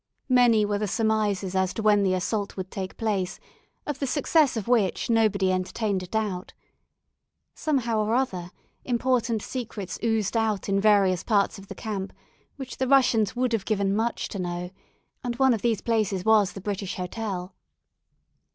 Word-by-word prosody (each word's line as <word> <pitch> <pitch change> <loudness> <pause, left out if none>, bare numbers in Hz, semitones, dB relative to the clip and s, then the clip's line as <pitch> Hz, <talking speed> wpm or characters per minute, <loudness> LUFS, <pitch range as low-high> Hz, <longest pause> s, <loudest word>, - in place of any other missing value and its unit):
Many 240 -4 +5
were 205 0 -1
the 210 - -1
surmises 210 -3 0
as 190 -1 +1
to 220 - -3
when 210 -1 +5
the 190 -2 +2
assault 200 +3 -2
would 185 0 -5
take 190 -1 -5
place, 195 -5 -1 0.5
of 290 -2 -4
the 275 - -1
success 290 -1 +2
of 215 - -4
which 230 -2 +1
nobody 205 -4 +3
entertained 185 +2 -1
a 185 - -7
doubt. 200 -3 -3 1.0
Somehow 240 -7 0
or 215 +2 +1
other, 185 -9 -1 0.3
important 240 -3 0
secrets 215 -7 -5
oozed 225 -2 0
out 220 -3 0
in 195 0 +1
various 195 -4 +4
parts 200 -3 +1
of 195 - -13
the - - -8
camp, 200 -3 -4 0.4
which 265 -2 -8
the 260 - 0
Russians 250 -6 +3
would 250 -1 0
have 220 -4 0
given 200 -2 0
much 225 +2 -1
to 200 - -5
know, 175 0 -4 0.5
and 240 -1 -2
one 265 0 +4
of 220 - -2
these 230 -4 +1
places 210 -5 0
was 215 -3 +4
the 195 - -8
British 195 -1 -3
Hotel. 185 -1 -4
215 Hz, 170 wpm, -26 LUFS, 190-230 Hz, 1.0 s, Many